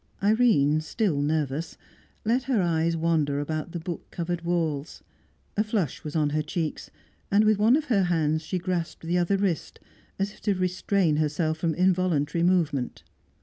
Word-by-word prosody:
Irene, 200 - +4
still 160 -3 0
nervous, 150 +1 -1 0.5
let 235 +4 +2
her 260 -5 +1
eyes 165 -2 +1
wander 155 -4 +1
about 155 +3 -3
the 170 - -4
book 170 +1 -6
covered 175 0 -3
walls; 165 -4 -2 0.5
a 210 - +2
flush 210 - -2
was 150 0 -6
on 150 -2 +2
her 155 +1 +1
cheeks, 155 +1 -4 0.4
and 205 +2 +4
with 215 -1 +3
one 225 +5 +5
of 310 +1 0
her 205 -9 +2
hands 160 -3 +1
she 175 +4 -3
grasped 175 -2 -3
the 175 +2 +1
other 175 +3 +2
wrist, 190 -5 -2 0.4
as 195 +1 -1
if - - -18
to 205 -2 +1
restrain 185 -2 +1
herself 155 +1 0
from 165 -1 0
involuntary 175 -4 +1
movement. 160 -8 +1
170 Hz, 165 wpm, -26 LUFS, 155-190 Hz, 0.5 s, one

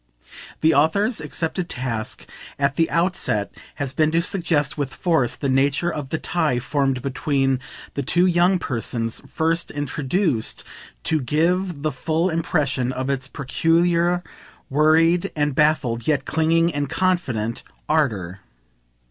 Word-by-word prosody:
The 160 +1 +4
author's 180 - +2
accepted 165 +4 -3
task 115 -3 -3 0.3
at 140 0 +1
the 165 - +2
outset 170 - 0 0.2
has 140 -2 -3
been 155 0 +2
to 165 - +3
suggest 165 -6 0
with 140 -3 -3
force 135 -6 +1
the 140 - -3
nature 140 +5 +2
of 145 -3 -5
the 160 - -1
tie 155 -6 0
formed 135 0 0
between 135 -1 0 0.3
the 140 - -2
two 175 +7 +2
young 180 +1 +3
persons 115 -6 -3
first 165 +1 0
introduced 145 - -1 0.4
to 155 -2 +1
give 165 +4 0
the 155 - +1
full 160 +6 0
impression 150 -6 0
of 130 +1 -2
its 130 -1 -3
peculiar 170 +6 +1 0.5
worried 160 +4 +3
and 150 -2 0
baffled, 130 -6 +1
yet 145 -3 +1
clinging 165 +1 +2
and 145 -1 -2
confident, 130 -13 0 0.3
ardour. 105 - 0
150 Hz, 130 wpm, -22 LUFS, 130-170 Hz, 0.5 s, The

